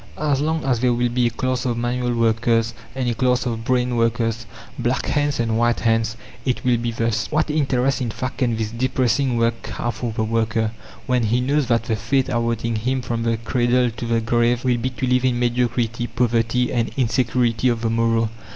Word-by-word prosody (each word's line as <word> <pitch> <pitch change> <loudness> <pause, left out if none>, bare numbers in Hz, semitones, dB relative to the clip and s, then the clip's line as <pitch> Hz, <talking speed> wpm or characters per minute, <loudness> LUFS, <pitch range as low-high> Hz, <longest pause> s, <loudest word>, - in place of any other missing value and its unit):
As 145 -3 0
long 160 0 -1
as 125 -4 +1
there 125 0 +2
will 120 0 +1
be 120 0 +1
a - - +1
class 130 +2 -2
of 120 -3 -1
manual 120 0 -1
workers 115 0 +2 0.2
and 130 -2 -1
a 120 - +1
class 125 +2 +1
of 115 -2 -3
"brain" 125 0 +1
workers, 115 0 0 0.3
black 125 +1 0
hands 145 -2 0
and 115 -1 0
white 120 0 +2
hands, 115 0 +1 0.3
it 130 0 -2
will 125 -1 +3
be 120 +1 -2
thus. 115 -1 -1
What 155 0 +1
interest, 135 -3 +1
in 120 - -1
fact, 130 +4 -5
can 120 -4 +1
this 110 -1 -2
depressing 130 +1 +1
work 115 0 0
have 120 0 -3
for 120 -2 -4
the 110 0 -2
worker, 110 0 0 0.3
when 125 -1 +1
he 115 +3 +2
knows 140 +2 +1
that 115 -1 +2
the 115 - -1
fate 125 +6 0
awaiting 115 -1 -1
him 130 +3 -1
from 115 -1 -2
the 115 0 0
cradle 120 +2 +1
to 115 +1 -6
the 115 -1 +1
grave 120 +1 +1
will 125 -1 +2
be 130 +3 -1
to 130 +1 -3
live 125 0 +2
in 125 -2 +2
mediocrity, 120 -1 0
poverty, 120 0 +1
and 115 -2 0
insecurity 120 -1 +1
of 115 -2 -1
the 115 - 0
morrow? 115 -1 +1
120 Hz, 205 wpm, -21 LUFS, 115-125 Hz, 0.3 s, will